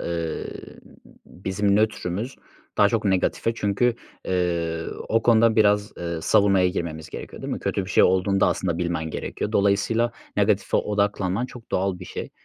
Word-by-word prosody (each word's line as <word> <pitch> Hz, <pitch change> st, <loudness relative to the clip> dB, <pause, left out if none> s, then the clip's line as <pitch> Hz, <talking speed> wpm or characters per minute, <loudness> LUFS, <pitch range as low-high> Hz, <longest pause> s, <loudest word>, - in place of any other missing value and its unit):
ı -, -, -5 dB
ııı, 85 Hz, -1 st, -5 dB, 0.5 s
bizim 100 Hz, +2 st, 0 dB
nötrümüz 110 Hz, +2 st, -1 dB, 0.4 s
daha 100 Hz, -, +6 dB
çok 110 Hz, 0 st, -1 dB
negatife 100 Hz, +4 st, +1 dB
çünkü, 115 Hz, +3 st, +1 dB, 0.3 s
ııı, 85 Hz, -3 st, -1 dB
o 115 Hz, +1 st, +2 dB
konuda 115 Hz, -1 st, +4 dB
biraz, 105 Hz, -1 st, +3 dB
ııı, 85 Hz, -1 st, -4 dB
savunmaya 95 Hz, 0 st, +4 dB
girmemiz 80 Hz, -4 st, -4 dB
gerekiyor, -, -, -8 dB
değil -, -, -3 dB
mi? -, -, -2 dB
Kötü 100 Hz, -, -1 dB
bir -, -, -8 dB
şey -, -, +5 dB
olduğunda 95 Hz, +1 st, +3 dB
aslında 85 Hz, -3 st, -1 dB
bilmen 85 Hz, -2 st, -2 dB
gerekiyor. 105 Hz, -, -4 dB
Dolayısıyla 105 Hz, +4 st, +2 dB, 0.2 s
negatife -, -, +2 dB
odaklanman 100 Hz, +1 st, 0 dB
çok 120 Hz, -3 st, -13 dB
doğal 95 Hz, -1 st, 0 dB
bir 90 Hz, -, -8 dB
şey. -, -, -6 dB
100 Hz, 155 wpm, -24 LUFS, 90-105 Hz, 0.5 s, daha